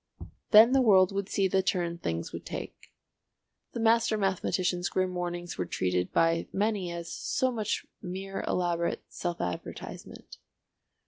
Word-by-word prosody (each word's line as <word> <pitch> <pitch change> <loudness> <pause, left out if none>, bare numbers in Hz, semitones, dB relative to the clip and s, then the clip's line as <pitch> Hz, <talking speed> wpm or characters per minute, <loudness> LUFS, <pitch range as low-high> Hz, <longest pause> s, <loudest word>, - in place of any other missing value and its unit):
Then 220 +3 +8
the 270 0 +4
world 190 -6 +5
would 200 0 -3
see 195 -1 +2
the 190 +1 +2
turn 175 -3 -1
things 85 - -3
would - - -6
take. - - -8 0.8
The - - -4
master 225 -1 +3
mathematician's 185 -2 0
grim 185 -1 0
warnings 175 - -4
were 90 - 0
treated 90 0 -1
by 165 0 +2
many 205 -3 0
as 170 0 -6
so 260 0 0
much 220 -3 -2 0.2
mere 195 +1 -5
elaborate 170 -1 0
self 175 -1 -4
advertisement. 90 - -7
185 Hz, 140 wpm, -29 LUFS, 170-205 Hz, 0.8 s, Then